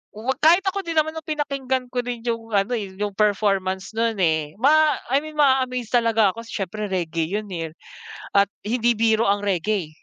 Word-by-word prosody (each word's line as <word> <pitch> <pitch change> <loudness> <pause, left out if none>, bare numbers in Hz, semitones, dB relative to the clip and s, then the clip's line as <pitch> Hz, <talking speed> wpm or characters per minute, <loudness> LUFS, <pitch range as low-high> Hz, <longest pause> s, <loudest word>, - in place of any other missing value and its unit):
'wag 245 +5 -3
kahit 340 +5 +5
ako 390 0 -1
din 335 -4 -4
naman 315 0 +2
nung 320 0 -9
pinakinggan 270 -4 -2
ko 250 - -1
din 245 -1 -4
yung 230 -2 -3
ano, 200 +4 +1
eh, 200 -5 -3
yung 205 +1 -2
performance 195 -2 0
nun, 225 0 0
eh, 160 -5 0
ma 300 +6 +4 0.2
I 275 - +4
mean 310 +1 -9
ma-aamaze 260 -5 +2
talaga 225 -4 +3
ako 230 - -10
siyempre 210 0 -4
reggae 170 -4 -2
yun, 210 -2 -4
eh. 165 -2 -5 0.6
At 200 0 +4
hindi 235 +2 +1
biro 225 0 +2
ang 200 +1 +2
reggae. 195 -2 -1
225 Hz, 185 wpm, -23 LUFS, 200-260 Hz, 0.6 s, kahit